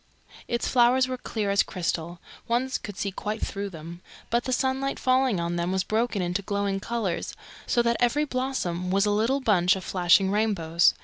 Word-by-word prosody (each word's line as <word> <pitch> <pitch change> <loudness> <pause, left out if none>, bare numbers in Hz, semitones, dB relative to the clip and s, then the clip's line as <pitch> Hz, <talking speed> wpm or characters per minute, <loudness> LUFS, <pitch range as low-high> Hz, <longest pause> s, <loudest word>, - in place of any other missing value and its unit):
Its 235 - -1
flowers 255 +1 +4
were 255 - -3
clear 215 -4 -3
as 200 - +4
crystal 170 -1 -3 0.3
one 240 +3 +1
could 205 -3 -8
see 200 - -2
quite 210 +3 -4
through 200 0 -4
them 170 0 -10 0.3
but 235 +1 +1
the 255 - -2
sunlight 265 +2 0
falling 255 -5 +2
on 170 +1 -2
them 170 +1 -1
was 190 0 +1
broken 220 -2 0
into 180 +3 -1
glowing 200 0 -1
colours, 210 -5 -3 0.3
so 240 - +2
that 235 0 +1
every 250 +5 +2
blossom 255 - -2
was 195 +2 +2
a 205 - +1
little 230 +7 +1
bunch 185 -6 +3
of 190 - -6
flashing 185 +1 +3
rainbows. 185 -6 +2
205 Hz, 185 wpm, -26 LUFS, 180-240 Hz, 0.3 s, flowers